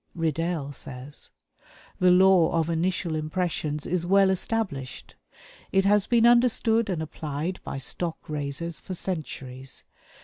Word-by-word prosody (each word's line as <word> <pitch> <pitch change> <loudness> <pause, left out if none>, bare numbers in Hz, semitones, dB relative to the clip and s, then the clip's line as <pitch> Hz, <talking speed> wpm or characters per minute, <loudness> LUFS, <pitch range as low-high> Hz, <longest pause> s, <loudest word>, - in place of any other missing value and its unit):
Riddell 165 -2 -1
says: 135 +1 -9 0.7
"The 185 - +5
law 180 -2 +5
of 165 0 +1
initial 170 0 -1
impressions 155 -2 -2
is 175 -1 -1
well 195 +2 +4
established. 185 - -3 0.6
It 195 0 +3
has 205 0 +4
been 235 -1 +4
understood 235 -2 +4
and 170 -4 -1
applied 155 +3 -4
by - - -5
stock 165 +5 -3
raisers 150 +2 -4
for 185 - -6
centuries. 135 -8 -5
170 Hz, 125 wpm, -26 LUFS, 150-190 Hz, 0.7 s, The